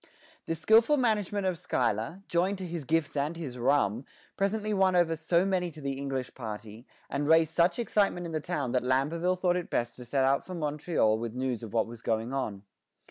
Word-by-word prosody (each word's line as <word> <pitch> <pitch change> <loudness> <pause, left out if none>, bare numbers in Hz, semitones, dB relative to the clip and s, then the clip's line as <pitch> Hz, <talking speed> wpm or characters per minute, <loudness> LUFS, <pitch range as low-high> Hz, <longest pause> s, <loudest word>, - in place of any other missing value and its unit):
The 165 - -1
skilful 225 - +4
management 210 -5 0
of 180 -3 -1
Schuyler, 120 - -1
joined 185 +4 +1
to 185 - -5
his 170 -4 -5
gifts 160 0 0
and 145 +4 -1
his 135 -7 -6
rum, 120 -3 +2 0.3
presently 210 +2 0
won 190 -2 +3
over 170 -2 +3
so 170 +3 +2
many 185 -2 0
to 155 -1 -12
the 140 -2 -3
English 135 -1 -4
party, 110 0 -8 0.2
and 145 +1 -2
raised 160 0 +4
such 170 +1 +3
excitement 205 -6 +1
in 170 - -5
the 155 - -1
town 150 -6 -2
that 125 - +2
Lamberville 155 +8 +1
thought 180 -1 +2
it 180 - -4
best 120 0 -1
to 125 - -9
set 135 +2 +1
out 135 +1 +2
for 185 - -7
Montreal 150 -8 +1
with 115 0 -5
news 125 -3 -2
of 115 -3 -8
what 115 -1 +2
was 115 0 -10
going 115 +3 -1
on. 105 -7 -3
155 Hz, 205 wpm, -29 LUFS, 125-180 Hz, 0.3 s, skilful